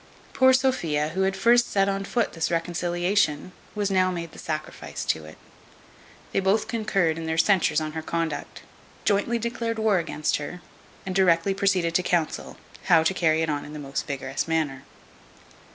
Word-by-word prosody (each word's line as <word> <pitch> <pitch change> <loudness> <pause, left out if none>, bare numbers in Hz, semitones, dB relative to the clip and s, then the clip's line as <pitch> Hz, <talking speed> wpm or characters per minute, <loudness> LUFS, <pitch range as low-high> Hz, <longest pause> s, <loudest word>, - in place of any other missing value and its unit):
Poor 260 0 +5
Sophia, 175 - +1
who 185 +4 -2
had 190 0 +1
first 240 +4 +4
set 195 -1 +2
on 195 0 -1
foot 235 +3 -1
this 165 -1 -1
reconciliation, 175 0 0 0.2
was 205 -1 -1
now 185 -1 +3
made 170 -3 -5
the - - -13
sacrifice 155 -1 -5
to 80 -1 -1
it. 75 - -12 0.9
They - - +1
both 195 +3 +1
concurred 195 -8 0
in 165 - -5
their 160 0 -1
censures 190 0 +3
on 155 -1 -4
her 160 +1 -4
conduct; 165 -1 -4 0.4
jointly 205 +3 +2
declared 230 0 -3
war 220 -4 +2
against 155 -2 -1
her, 150 +5 -6 0.5
and 185 - -3
directly 185 0 +3
proceeded 190 -4 +1
to 180 - +3
counsel, 175 -3 -1 0.3
how 165 -3 +5
to 165 - +2
carry 160 -3 +2
it 160 - -1
on 145 -1 -2
in 150 - -10
the - - -6
most 135 -2 -4
vigorous 135 0 -3
manner. 150 -5 -1
175 Hz, 175 wpm, -25 LUFS, 160-200 Hz, 0.9 s, Poor